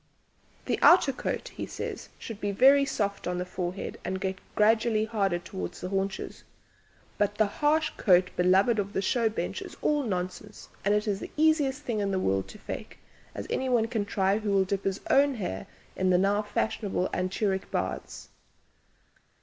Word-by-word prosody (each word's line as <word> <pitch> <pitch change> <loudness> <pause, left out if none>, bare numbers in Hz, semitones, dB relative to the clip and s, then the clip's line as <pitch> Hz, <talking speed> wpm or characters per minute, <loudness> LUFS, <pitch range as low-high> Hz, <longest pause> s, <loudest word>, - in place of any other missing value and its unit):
"The - - -1
outer 340 -6 +6
coat," - - -3
he - - -6
says, - - -6
"should 225 -4 -8
be 205 - 0
very 275 +7 +6
soft 200 -8 -2
on 180 0 -1
the 180 - -2
forehead 180 +1 -5
and 190 +1 -3
get 190 -1 -3 0.2
gradually 220 0 +3
harder 200 -5 0
towards 90 - -6
the 180 - -5
haunches, 195 0 -3 0.8
but 205 0 +1
the 215 - +3
harsh 300 +9 +1
coat 185 -2 +4
beloved 190 +5 +3
of 200 0 -2
the - - 0
show 230 +2 +2
bench 215 - -3
is - - -9
all 295 -1 +2
nonsense, 200 -1 -5
and 205 +1 +3
is 210 -2 0
the - - -7
easiest 295 -3 +2
thing 235 -5 -2
in 200 -1 0
the 190 - 0
world 95 - 0
to - - -11
'fake,' - - -7 0.4
as 100 - -5
anyone 250 -4 +1
can 225 -3 -1
try 200 0 +1
who 215 -1 -3
will 195 -1 +3
dip 195 +1 -2
his 195 0 -1
own 280 0 +4
hair 100 - -4 0.3
into 185 0 +1
the 180 - +5
now 200 +3 +2
fashionable 205 -2 -1
'anturic' 190 +1 -1
baths. - - -4
205 Hz, 175 wpm, -28 LUFS, 190-230 Hz, 0.8 s, outer